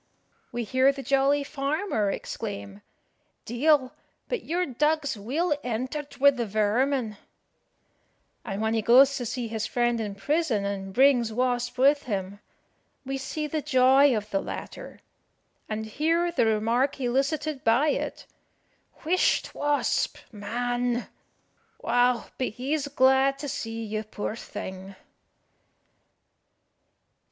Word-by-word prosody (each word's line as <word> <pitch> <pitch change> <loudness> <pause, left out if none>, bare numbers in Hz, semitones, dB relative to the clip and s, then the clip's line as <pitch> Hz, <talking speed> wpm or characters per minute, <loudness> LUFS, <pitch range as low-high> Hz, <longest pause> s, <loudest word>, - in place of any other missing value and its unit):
We 240 0 -3
hear 260 +4 +3
the 275 -1 -8
jolly 275 +2 +2
farmer 280 - -1
exclaim 100 - -6 0.6
"De'il, 260 +2 +2 0.4
but 485 -7 -3
your 355 +3 -1
dog's 300 +1 0
weel 290 - -1
entered 255 +5 -4
wi' 280 +1 +6
the 240 -4 -3
vermin;" 220 +3 0 1.3
and 205 -2 -4
when 220 0 +1
he 225 - +1
goes 265 +5 +6
to 245 - -4
see 240 0 -3
his 220 0 -3
friend 240 -1 0
in 205 -2 -4
prison, 250 -1 0
and 195 -1 -4
brings 245 -1 +4
Wasp 245 +1 -1
with 280 +3 +4
him, 200 -3 -4 0.7
we 270 +1 -3
see 305 +3 -4
the 300 +1 -2
joy 260 0 +5
of 210 0 -6
the 195 - +1
latter, - - -8 0.7
and 220 0 -3
hear 330 +9 0
the 285 -9 +2
remark 230 +6 +1
elicited 275 +3 -1
by 235 +7 +3
it - - -3 0.8
"Whisht, 355 +3 +1
Wasp 290 0 0
man! 245 +3 -2 0.7
Wow, 245 0 +2
but 255 - +1
he's 275 +6 -2
glad 265 0 +3
to 290 - -6
see 225 -3 -4
you, 215 0 -3
poor 215 0 -5
thing." 190 -3 -8
250 Hz, 125 wpm, -26 LUFS, 220-280 Hz, 1.3 s, wi